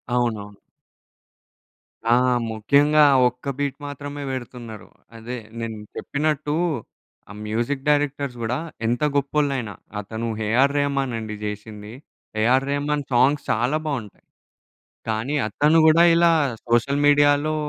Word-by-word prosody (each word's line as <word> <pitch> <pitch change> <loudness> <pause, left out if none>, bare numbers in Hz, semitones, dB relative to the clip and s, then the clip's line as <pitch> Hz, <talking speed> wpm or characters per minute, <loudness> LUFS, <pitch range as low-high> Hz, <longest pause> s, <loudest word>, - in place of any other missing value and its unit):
అవునవును. 105 -4 -2 1.5
ఆ! 120 +1 +5 0.3
ముఖ్యంగా 145 +8 +4 0.2
ఒక్క 125 +3 -6
బీట్ 140 -2 -2
మాత్రమే 145 0 -6
పెడుతున్నారు. 120 -4 -7 0.3
అదే 120 +2 -6 0.2
నేను 115 -1 -4 0.2
చెప్పినట్టు 150 0 -1 0.8
ఆ! - - -9
మ్యూజిక్ 120 +6 -2
డైరెక్టర్స్ 145 -3 0
గూడా 120 +3 -1 0.3
ఎంత 120 +1 0
గొప్పోళ్ళయినా, 140 -5 0 0.3
అతను 110 +3 -5 0.2
'ఏఆర్ 130 +6 +3
రెహమాన్' 140 -3 0
అండి 110 -1 -5
చేసింది. 105 +1 -7 0.5
'ఏఆర్ 130 +4 +3
రెహమాన్' 145 0 -1
సాంగ్స్ 135 +4 +3
చాలా 120 +7 +1
బావుంటాయి. 120 -9 -5 0.8
కానీ 110 +6 -1
అతను 150 +9 +3
గూడా 160 +2 +6
ఇలా 170 0 +5 0.4
సోషల్ 120 +5 +1
మీడియాలో 145 +1 +4
130 Hz, 110 wpm, -23 LUFS, 115-145 Hz, 1.5 s, గూడా